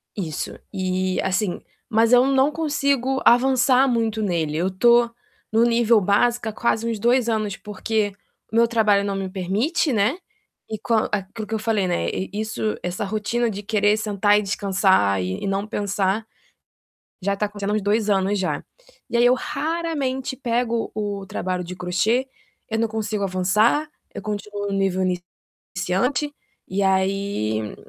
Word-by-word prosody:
Isso, 165 -7 -4 0.2
e, 185 -1 -1
assim, 190 -1 -1 0.3
mas 225 +1 +3
eu 250 +1 +7
não 270 +2 +3
consigo 280 -4 0
avançar 260 +1 +5
muito 225 -3 0
nele, 165 -6 -1
eu 180 +3 +1
estou 235 +5 +4 0.4
no 225 +1 +4
nível 235 -1 +4
básico, 230 +4 +2
há, - - -4
quase 230 0 0
uns 225 -3 -3
2 240 +1 +2
anos, 215 -3 -1
porque 210 0 -2 0.4
o - - -5
meu 235 0 +5
trabalho 215 -3 +3
não 200 -1 -2
me 190 -1 -3
permite, 220 - 0
né, 210 - +2 0.5
e 215 - -3
com 230 - -2 0.2
aquilo 210 +2 -4
que 225 - -5
eu 220 - -2
falei, 215 -4 0
né, 175 - 0 0.3
isso 215 0 -2
essa 180 +3 -3
rotina 220 +3 -1
de 205 0 -5
querer 210 0 +2
sentar 205 -1 +2
e - - -1
descansar 190 - +2
e 95 +1 -3
e - - -1
não 195 +1 -1
pensar 200 0 -1 1.0
já 200 +1 +1
está 210 +1 -1
acontecendo 205 0 -4
há - - +1
uns 215 - 0
2 210 +1 +1
anos 195 +1 +2
já. 185 - -1 0.5
E 235 - 0
aí 240 - +4
eu 245 - +6
raramente 280 -3 -2
pego 235 -2 -1
o 205 -2 -3
trabalho 180 -1 -3
de 180 +1 -7
crochê, 215 +9 0 0.4
eu 220 - 0
não 230 - +2
consigo 215 -2 -2
avançar, 210 +11 +2 0.3
eu - - -5
continuo 205 -1 -4
no - - -2
nível 190 -1 +1 0.6
iniciante, 245 +11 -2 0.3
e 195 +2 -1
aí, 190 - 0
210 Hz, 160 wpm, -23 LUFS, 195-235 Hz, 1.0 s, eu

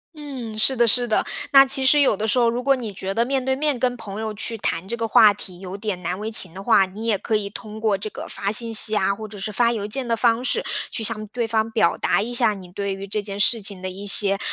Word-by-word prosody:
嗯， 260 -7 -7
是 260 +5 +3
的 240 -1 +3
是 245 +2 +4
的。 220 - +2 0.3
那 275 -1 +8
其 265 0 +2
实 295 +3 +5
有 260 -7 +3
的 220 - -2
时 235 +4 +2
候， 235 -1 +3
如 240 +2 -3
果 275 +1 +3
你 235 -5 -5
觉 190 0 -5
得 230 - +2
面 265 0 -1
对 265 0 +1
面 290 -1 -1
跟 245 +1 0
朋 215 -3 -8
友 220 -1 -4
去 225 +2 -2
谈 180 -3 -2
这 235 - -4
个 230 -1 -2
话 215 -1 +6
题 185 -3 -10
有 190 +1 -7
点 200 -3 -4
难 180 +1 -3
为 215 +1 -4
情 190 -5 +3
的 195 +2 -9
话， 195 -1 +4
你 205 +4 -8
也 225 -2 +2
可 220 +3 -2
以 210 -1 -1
通 215 0 -9
过 220 -2 +1
这 205 +3 -5
个 - - -8
发 200 0 -3
信 230 +1 0
息 215 0 +2
啊， 195 0 +1
或 215 +2 -8
者 205 -1 -11
是 195 +3 -4
发 235 +3 +2
邮 215 -4 -3
件 240 +4 -3
的 230 -1 0
方 230 +1 +2
式， - - -1 0.3
去 225 - -3
向 215 -1 -2
对 235 +2 -3
方 220 0 0
表 220 -6 +2
达 - - +1
一 240 +2 -5
下 235 -3 +2
你 185 -2 -12
对 200 +1 -3
于 195 +1 -7
这 210 +2 -2
件 200 -1 -6
事 225 +2 +2
情 195 -2 -3
的 185 - -2
一 200 +2 -8
些， 200 0 +4
220 Hz, 310 characters per minute, -22 LUFS, 200-235 Hz, 0.3 s, 那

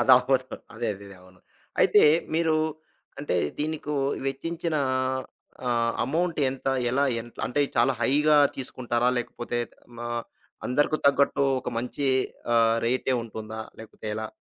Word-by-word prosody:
అదవ్వదు 130 +2 +5 0.3
అదే 115 0 -2
అదేదే 100 -1 -12
అవును. 90 0 -19 0.4
అయితే, - - +6 0.3
మీరు 160 -1 +2 0.6
అంటే, 145 -11 -1 0.2
దీనికు 150 0 -2 0.3
వెచ్చించిన 165 +4 -2 0.9
ఆహ్, 115 -1 +2
అమౌంట్ 165 +5 -1
ఎంత? 135 0 -7 0.2
ఎలా 140 +3 +2 0.2
ఎన్ 120 +1 -10 0.2
అంటే, 145 +4 0 0.2
చాలా 135 - +4
హైగా 150 +4 +4 0.2
తీసుకుంటారా? 125 -2 -1
లేకపోతే 120 0 -4
త్ - - -24 0.2
మా 120 - -4 0.6
అందరుకు 145 +4 +2
తగ్గట్టు 140 0 +3 0.2
ఒక - - -5
మంచి 125 +3 -3 0.5
ఆహ్, 115 0 +4
రేటే 130 +1 +1
ఉంటుందా? 110 -1 -7 0.2
లేకపోతే 110 -1 -10
ఎలా? 110 0 -3
130 Hz, 125 wpm, -26 LUFS, 115-145 Hz, 0.9 s, అయితే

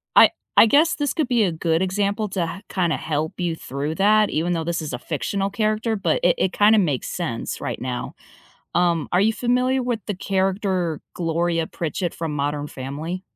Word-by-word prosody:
I - - +8 0.3
I - - +10
guess 305 +9 +4
this 290 -2 -1
could 310 -5 0
be 240 -3 +3
a 185 - +1
good 165 +1 0
example 200 +3 0
to 190 -2 -1
h 200 - -14
kinda 175 -4 0
help 155 0 -2
you 175 -2 -1
through 145 +1 -4
that, 210 +2 +4
even 170 +3 0
though 165 -1 -1
this 170 0 -1
is 155 - -5
a 125 - -3
fictional 195 +8 -2
character, 215 +2 0
but 200 - 0
it - - +4
it 190 - 0
kinda 215 +1 +5
makes 150 -10 0
sense 155 -11 -4
right - - -4
now. 125 -1 -4 0.6
Um, 170 -3 +1
are 180 - +3
you 220 +2 +3
familiar 250 +3 +1
with 240 -2 -1
the 205 - -2
character 190 -3 -1
Gloria 165 -1 0
Pritchett 170 +2 -3
from 165 -2 -4
Modern 145 +1 -2
Family? 150 +8 -5
180 Hz, 195 wpm, -22 LUFS, 160-210 Hz, 0.6 s, I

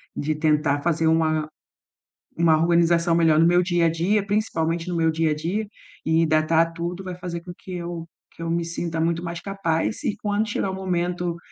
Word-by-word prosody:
de 155 +1 -1
tentar 150 -2 +1
fazer 165 0 +1
uma 155 -1 +2 0.9
uma 165 -1 +4
organização 170 0 +3
melhor 165 -2 +4
no 165 - +5
meu 175 +1 +4
dia 175 -2 +2
a - - +3
dia, 195 +5 +1
principalmente 170 -5 -1
no 175 - -2
meu 160 -1 +3
dia 160 0 +1
a - - 0
dia, 180 +8 -2 0.4
e 160 +1 +3
datar 160 +2 +2
tudo 175 +2 -4
vai 185 -1 -5
fazer 175 -1 -5
com 175 0 -8
que 185 - -10
eu 170 -1 -5 0.3
que - - -10
eu 165 - -3
me 170 0 0
sinta 165 0 -4
muito 170 +1 0
mais 170 0 -5
capaz 195 -1 -2
e 205 - -1
quando 210 +1 -1
chegar 195 -2 -1
o - - -4
momento 180 -2 -2
170 Hz, 200 wpm, -23 LUFS, 160-180 Hz, 0.9 s, no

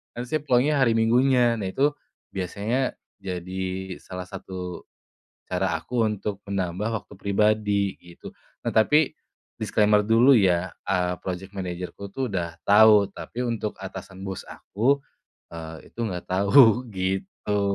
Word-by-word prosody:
nah 120 - -4
saya 155 +4 0
pulangnya 140 +2 +3
hari 115 -2 +3
minggunya 120 +1 +4
nah 95 - -2
itu, 140 +8 +2 0.4
biasanya 105 +8 -1 0.3
jadi 95 +1 -4
salah 90 -1 -7
satu, 90 -2 -7 0.6
cara 90 -1 -1
aku 120 +7 -1
untuk 100 -1 -4
menambah 95 +3 -1
waktu 105 - -15
pribadi 100 -1 +1
gitu 85 -1 -12 0.3
nah - - +2
tapi, 150 +7 +4 0.4
disclaimer 105 -1 +3
dulu 115 +5 +6
ya, 95 -3 +2 0.2
eee, 90 -1 +1
project 95 +2 -5
managerku 90 +2 -5
tuh 135 -1 -2
udah 85 -3 -3
tahu 105 -1 +7
tapi 125 - -7
untuk 110 -2 -3
atasan 95 0 -8
bos 95 -1 -5
aku, 130 +8 0 0.5
eee, 80 -1 -9
itu - - -16
nggak 90 -3 -5
tahu 115 +5 +5
gitu. 95 +1 -2
100 Hz, 130 wpm, -25 LUFS, 95-115 Hz, 0.6 s, tahu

